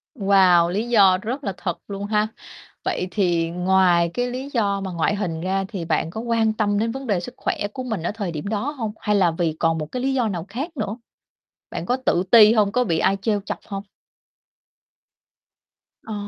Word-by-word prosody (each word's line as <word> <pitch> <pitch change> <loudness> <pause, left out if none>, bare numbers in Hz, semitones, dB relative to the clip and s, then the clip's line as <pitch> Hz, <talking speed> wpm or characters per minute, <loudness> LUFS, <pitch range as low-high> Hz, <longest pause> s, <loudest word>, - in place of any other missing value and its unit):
Wow, 190 -5 +4
lý 210 +6 -2
do 195 -5 +6
rất 250 +6 -4
là 195 - -2
thật 175 -3 -3
luôn 200 0 -5
ha. 210 0 +1 0.6
Vậy 180 - -1
thì 170 -4 +1
ngoài 180 -1 +3
cái 245 0 -1
lý 260 +3 -5
do 200 -5 +1
mà 190 -1 -4
ngoại 170 +4 0
hình 175 -6 -3
ra 190 +2 -1
thì 195 -5 -5
bạn 160 - 0
có 220 +6 -5
quan 230 -2 +1
tâm 205 -2 0
đến 225 +1 0
vấn 270 +2 -6
đề 200 -5 +1
sức 175 - -8
khỏe - - -1 0.2
của 255 - -5
mình 220 -9 -3
ở - - -1
thời 205 -4 -4
điểm 155 +4 -5
đó 220 +7 -1
hông? 230 -8 -4
Hay 210 -1 0
là 185 -4 +4
vì 165 -1 -1
còn 165 -1 +2
một 155 - -3
cái 250 - -3
lý 270 0 +1
do 250 -4 +1
nào 175 -4 -4
khác 285 - -5
nữa? 210 -2 -3 0.7
Bạn - - -5
có 250 +1 +1
tự 175 - +2
ti 220 -2 +8
hông? 210 -3 +3
Có 250 +3 +2
bị 165 -8 0
ai 195 - +2
trêu 210 -1 0
chọc - - -4
hông? 195 -2 -5 2.2
Ờ. 220 - -7
200 Hz, 215 wpm, -22 LUFS, 180-225 Hz, 2.2 s, ti